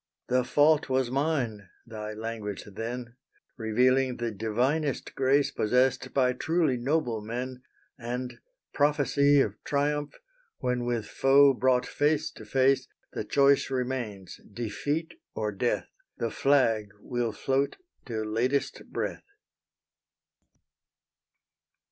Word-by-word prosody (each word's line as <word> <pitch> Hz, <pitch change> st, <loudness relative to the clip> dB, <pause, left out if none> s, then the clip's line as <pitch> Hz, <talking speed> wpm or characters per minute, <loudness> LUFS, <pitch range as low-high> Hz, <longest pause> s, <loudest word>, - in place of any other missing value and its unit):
"The 125 Hz, 0 st, +3 dB
fault 145 Hz, +4 st, +3 dB
was 130 Hz, -2 st, +1 dB
mine," 130 Hz, -, -1 dB, 0.2 s
thy 110 Hz, -2 st, -6 dB
language 110 Hz, -2 st, -5 dB
then, 120 Hz, +4 st, -6 dB, 0.4 s
Revealing 125 Hz, +3 st, +2 dB
the 120 Hz, -1 st, -2 dB
divinest 125 Hz, +8 st, -1 dB
grace 135 Hz, +2 st, +2 dB
Possessed 125 Hz, +4 st, +1 dB
by 125 Hz, -2 st, +2 dB
truly 160 Hz, +1 st, +1 dB
noble 125 Hz, -3 st, 0 dB
men, 125 Hz, +4 st, -5 dB, 0.4 s
And, 125 Hz, +1 st, -5 dB, 0.3 s
prophecy 145 Hz, -1 st, +3 dB
of 105 Hz, -4 st, -3 dB
triumph, 145 Hz, +1 st, -1 dB, 0.4 s
when 125 Hz, -1 st, -1 dB
With 120 Hz, -3 st, -1 dB
foe 140 Hz, +3 st, +5 dB
brought 125 Hz, -1 st, +2 dB
face 155 Hz, +2 st, 0 dB
to 110 Hz, -, -12 dB
face, 135 Hz, +4 st, +2 dB, 0.3 s
The -, -, -3 dB
choice 140 Hz, -1 st, +3 dB
remains, 125 Hz, -7 st, -4 dB
defeat 145 Hz, +9 st, -3 dB, 0.2 s
or 105 Hz, -1 st, -1 dB
death, 100 Hz, -, -1 dB, 0.3 s
The 115 Hz, -1 st, -2 dB
flag 115 Hz, -7 st, +2 dB
will 120 Hz, +1 st, -2 dB
float 135 Hz, +5 st, -1 dB, 0.3 s
till 110 Hz, -3 st, -3 dB
latest 125 Hz, +6 st, 0 dB
breath. -, -, -3 dB
125 Hz, 110 wpm, -28 LUFS, 115-140 Hz, 0.4 s, foe